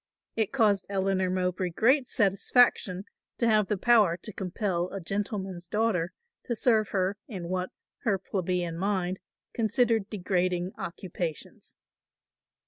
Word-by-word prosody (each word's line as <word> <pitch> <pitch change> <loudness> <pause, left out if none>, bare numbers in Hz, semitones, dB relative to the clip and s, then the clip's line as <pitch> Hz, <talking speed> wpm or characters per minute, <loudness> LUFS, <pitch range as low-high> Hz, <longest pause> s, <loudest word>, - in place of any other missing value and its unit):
It 220 -3 0
caused 210 -7 +2
Eleanor 190 -1 +1
Mowbray 180 0 0
great 255 - +3
satisfaction 200 -2 +3 0.3
to 235 - +1
have 215 -3 +4
the 210 - 0
power 210 -6 +4
to 215 - -6
compel 185 -1 -2
a 195 - -5
gentleman's 195 -1 -3
daughter 210 -5 0 0.3
to 235 - -1
serve 220 -2 +3
her 190 +1 0
in 180 -7 -6
what 185 0 -1 0.3
her 205 -4 +1
plebeian 180 -3 -2
mind 190 -2 -1 0.3
considered 225 -2 +1
degrading 180 -2 0
occupations. 170 -3 -6
195 Hz, 125 wpm, -28 LUFS, 180-215 Hz, 0.3 s, have